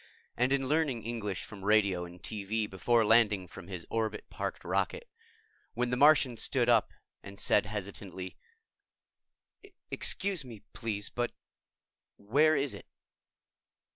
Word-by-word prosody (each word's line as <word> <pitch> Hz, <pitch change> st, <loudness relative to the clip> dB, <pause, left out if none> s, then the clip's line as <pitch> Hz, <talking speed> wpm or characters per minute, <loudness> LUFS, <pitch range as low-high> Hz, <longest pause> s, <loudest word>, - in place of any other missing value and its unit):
and 125 Hz, +2 st, +2 dB
in 135 Hz, -1 st, +1 dB
learning 145 Hz, -6 st, +1 dB
English 105 Hz, -5 st, -3 dB
from 100 Hz, -2 st, -10 dB
radio 100 Hz, -4 st, +3 dB
and 85 Hz, +1 st, -13 dB
TV 105 Hz, +1 st, -2 dB
before 110 Hz, +5 st, +2 dB
landing 105 Hz, -4 st, +4 dB
from 85 Hz, +1 st, -11 dB
his 90 Hz, -3 st, -6 dB
orbit 110 Hz, -1 st, -2 dB
parked -, -, -4 dB
rocket, 475 Hz, 0 st, -1 dB, 0.7 s
when 120 Hz, +1 st, 0 dB
the -, -, +2 dB
Martian 140 Hz, -3 st, +5 dB
stood -, -, 0 dB
up -, -, +4 dB, 0.3 s
and 100 Hz, 0 st, -10 dB
said -, -, +3 dB
hesitantly, 100 Hz, -2 st, -6 dB, 1.6 s
"Excuse 190 Hz, -5 st, 0 dB
me, 115 Hz, -5 st, -11 dB
please, 105 Hz, -3 st, -3 dB
but 120 Hz, 0 st, -2 dB, 0.8 s
where 145 Hz, +10 st, +3 dB
is 140 Hz, -1 st, 0 dB
it?" -, -, -10 dB
110 Hz, 130 wpm, -31 LUFS, 100-125 Hz, 1.6 s, Martian